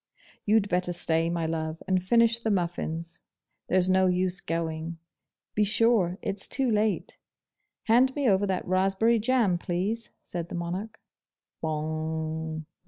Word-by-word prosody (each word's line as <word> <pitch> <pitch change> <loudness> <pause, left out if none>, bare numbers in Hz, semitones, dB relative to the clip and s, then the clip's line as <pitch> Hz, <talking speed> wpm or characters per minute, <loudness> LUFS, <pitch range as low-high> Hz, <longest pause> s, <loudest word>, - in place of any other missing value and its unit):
'You'd 210 -1 +4
better 180 -1 0
stay, 165 -1 +1
my 170 -1 -1
love, 160 0 -3
and 185 -1 +2
finish 230 +4 +3
the 225 - -2
muffins. 170 -3 -2 0.5
There's 185 0 +2
no 185 0 +4
use 185 +1 0
going. 165 0 -3 0.6
Be 210 - +2
sure 210 -4 +3
it's 195 0 -3
too 265 -3 +1
late. 215 -1 0 0.6
Hand 250 +3 +4
me 285 -3 +1
over 200 -1 +3
that 190 -1 -2
raspberry 195 +5 +2
jam, 215 -6 +2
please,' 195 +7 -2
said 170 -1 -5
the - - -5
Monarch. 185 +6 -4 0.6
'Bong! 160 0 -3
185 Hz, 135 wpm, -27 LUFS, 165-215 Hz, 0.6 s, You'd